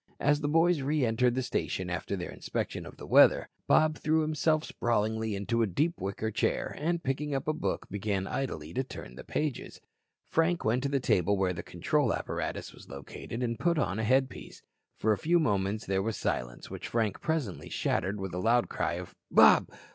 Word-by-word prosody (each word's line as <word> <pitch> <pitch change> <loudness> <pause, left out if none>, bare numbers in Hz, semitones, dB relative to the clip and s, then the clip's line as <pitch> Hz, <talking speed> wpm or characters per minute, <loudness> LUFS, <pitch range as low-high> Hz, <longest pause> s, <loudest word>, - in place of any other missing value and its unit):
As 145 +1 +2
the 145 - 0
boys 165 +1 +3
re 145 0 +1
entered 120 +2 +2
the 130 - 0
station 95 -6 -2
after 90 +2 -3
their 90 -2 -5
inspection - - -4
of - - -12
the - - -9
weather, - - +5 0.2
Bob 155 -1 +4
threw 160 +1 +2
himself 155 0 +1
sprawlingly 110 -3 -1
into 115 +4 0
a 115 - +3
deep 155 - 0
wicker 100 +3 -2
chair - - -1
and, 170 +3 -1
picking 140 +2 -1
up 135 +1 -3
a 155 - +2
book, 155 - -3
began 100 -1 -2
idly 80 - -4
to 130 - 0
turn 95 - -9
the 65 - -10
pages. 150 -4 -3 0.5
Frank 165 +2 +1
went 115 +3 +2
to 140 - -1
the 140 -1 +1
table 100 -4 +2
where 95 -1 +1
the 85 - -5
control - - 0
apparatus - - -4
was - - -15
located 70 - -6
and 115 -1 -2
put 170 -1 +2
on 110 -8 0
a - - -1
headpiece. 130 +3 0 0.3
For 110 - +2
a 100 - -3
few 170 - +3
moments 105 -6 0
there 95 0 0
was 110 +2 -2
silence, - - -3
which - - -6
Frank 110 -4 -1
presently 150 - -2
shattered 100 +2 -1
with 95 -2 -5
a 90 - -2
loud 115 +5 +2
cry - - -1
of: - - -6 0.2
"Bob. - - +6
115 Hz, 200 wpm, -30 LUFS, 100-150 Hz, 0.5 s, Bob